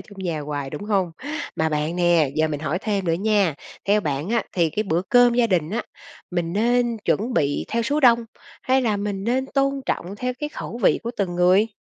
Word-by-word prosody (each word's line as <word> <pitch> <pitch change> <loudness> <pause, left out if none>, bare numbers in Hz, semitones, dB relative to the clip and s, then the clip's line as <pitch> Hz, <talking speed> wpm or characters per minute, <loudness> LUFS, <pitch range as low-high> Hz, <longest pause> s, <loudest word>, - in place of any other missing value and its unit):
chung 205 -2 -14
nhà 170 -5 -2
hoài, 145 -2 -4
đúng 205 - -6
hông? 190 -5 0 0.4
Mà 160 0 +1
bạn 155 +3 -1
nè, 170 -5 +3
giờ 155 0 +2
mình 150 -1 -3
hỏi 155 +3 -1
thêm 200 -4 -1
nữa 165 - +1
nha! 200 -3 +2 0.3
Theo 205 +1 +3
bạn 150 0 -2
á, 235 0 +1
thì 170 -3 +1
cái 215 - -1
bữa 175 -3 0
cơm 245 -1 +5
gia 240 -1 +3
đình 175 -5 0
á, 225 - -1 0.5
mình 175 -1 -2
nên 240 +2 +2
chuẩn 235 +5 0
bị 145 0 +1
theo 235 0 0
số 290 +6 0
đông, 235 -3 +5 0.4
hay 260 0 +2
là 215 -3 +1
mình 200 -1 -3
nên 260 +3 0
tôn 275 0 0
trọng 190 +4 -3
theo 250 +2 -2
cái 295 - -2
khẩu 235 - -7
vị - - +4
của 235 - -3
từng 185 -3 -1
người? 185 +4 +4
200 Hz, 225 wpm, -23 LUFS, 165-235 Hz, 0.5 s, cơm